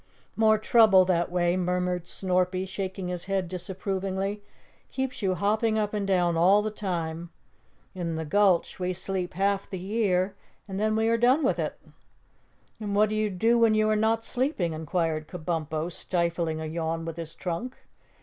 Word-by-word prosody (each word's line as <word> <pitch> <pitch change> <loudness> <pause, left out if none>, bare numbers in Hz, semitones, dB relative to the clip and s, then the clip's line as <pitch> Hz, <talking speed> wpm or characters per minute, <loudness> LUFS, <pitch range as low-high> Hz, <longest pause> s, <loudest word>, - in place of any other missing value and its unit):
"More 220 -1 +4
trouble 215 -4 +5
that 175 -2 +1
way," 175 0 +2
murmured 180 -1 -1
Snorpy, 185 0 0
shaking 190 -1 -4
his 180 -1 -3
head 190 -2 -1
disapprovingly. 190 +2 -3 0.5
"Keeps 265 -2 -3
you 190 -2 +1
hopping 215 +3 +1
up 210 -1 -1
and 205 -2 -1
down 175 -3 +2
all 190 +5 +5
the 215 - -2
time. 170 -5 -4 0.6
In 170 -3 -3
the 160 0 -3
Gulch 190 +1 +2
we 180 0 -1
sleep 185 0 -3
half 200 +1 0
the 190 - -4
year 190 -1 0 0.3
and 195 -1 -4
then 215 +1 +1
we 220 0 +2
are 230 0 +3
done 255 +6 +3
with - - +1
it." - - -3 1.0
"And 205 -2 -3
what 210 +1 +4
do 215 - -2
you 215 0 +1
do 225 +5 +2
when 225 -2 +4
you 215 0 +3
are - - +3
not 225 +1 +1
sleeping?" 245 - -1
inquired 160 0 -2
Kabumpo, 160 -2 -3
stifling 170 -2 -1
a 160 - -4
yawn 165 +1 -3
with 165 0 -6
his 165 -1 -7
trunk. 190 +9 -4
185 Hz, 170 wpm, -27 LUFS, 175-210 Hz, 1.0 s, trouble